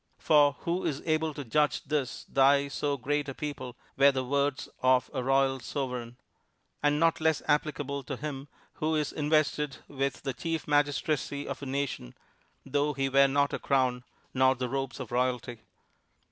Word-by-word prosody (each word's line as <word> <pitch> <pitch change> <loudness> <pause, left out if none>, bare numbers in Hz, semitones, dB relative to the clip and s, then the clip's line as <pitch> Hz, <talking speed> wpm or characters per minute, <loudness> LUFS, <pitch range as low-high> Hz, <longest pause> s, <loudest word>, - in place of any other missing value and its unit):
For 145 -2 +4
who 175 +2 -1
is 140 - -2
able 155 0 +1
to 145 - -6
judge 150 +6 +1
this 145 -3 -2
Thy 140 +1 +3
so 140 +1 -1
great 145 +2 -1
a 135 - -6
people, 130 -4 -6 0.2
were 140 +1 +6
the 130 -1 -2
words 140 +1 0
of 130 0 +3
a 130 - -1
royal 135 0 +2
Sovereign; 125 -3 -4 0.6
and 145 0 +2
not 165 0 +2
less 160 -1 +2
applicable 145 -1 0
to 135 - -4
him 140 -1 -5 0.3
who 155 +1 -1
is 150 -1 -1
invested 150 -1 +1
with 135 -2 -3
the 135 -2 -2
Chief 165 +6 -3
Magistracy 145 0 0
of 140 0 -5
a 140 - -5
nation, 135 - -3 0.5
though 145 +2 0
he 135 -1 -1
wear 140 +1 +5
not 140 +1 +1
a - - -2
crown, 130 -3 +1 0.3
nor 130 0 +4
the 125 -1 -3
robes 135 +1 -3
of 130 -3 -7
royalty. 125 -1 -1
140 Hz, 170 wpm, -29 LUFS, 130-150 Hz, 0.6 s, were